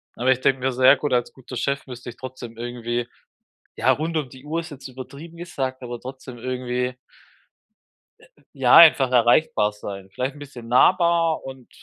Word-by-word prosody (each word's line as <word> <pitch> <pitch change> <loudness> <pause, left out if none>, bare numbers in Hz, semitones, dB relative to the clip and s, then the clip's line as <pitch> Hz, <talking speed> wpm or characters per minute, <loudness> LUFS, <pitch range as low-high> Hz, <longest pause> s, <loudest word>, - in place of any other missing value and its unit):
Aber 130 +2 +2
ich 130 - +1
denke 135 0 +2
mir, 130 +1 0
sehr 130 +2 +6
gut 145 -1 -2
als 120 -1 0
guter 130 -1 -9
Chef 140 +3 -2
müsste 125 -1 -8
ich 120 - -11
trotzdem 130 -3 -9
irgendwie 120 0 -3 0.7
ja, - - +2
rund 160 +2 -2
um 150 -4 -1
die 130 +2 -15
Uhr 155 +3 -3
ist 170 0 -5
jetzt 135 -2 -10
übertrieben 140 +6 -10
gesagt, 135 -7 -4
aber 120 -1 -6
trotzdem 130 -1 -9
irgendwie 125 0 -3 1.6
ja, 130 -3 +4
einfach 145 -6 +7
erreichbar 120 -3 +3
sein. 100 -2 -9
Vielleicht 130 +7 -3
ein - - -13
bisschen 130 -5 -10
nahbar 170 +5 +3
und 130 -2 -10
130 Hz, 175 wpm, -23 LUFS, 120-140 Hz, 1.6 s, einfach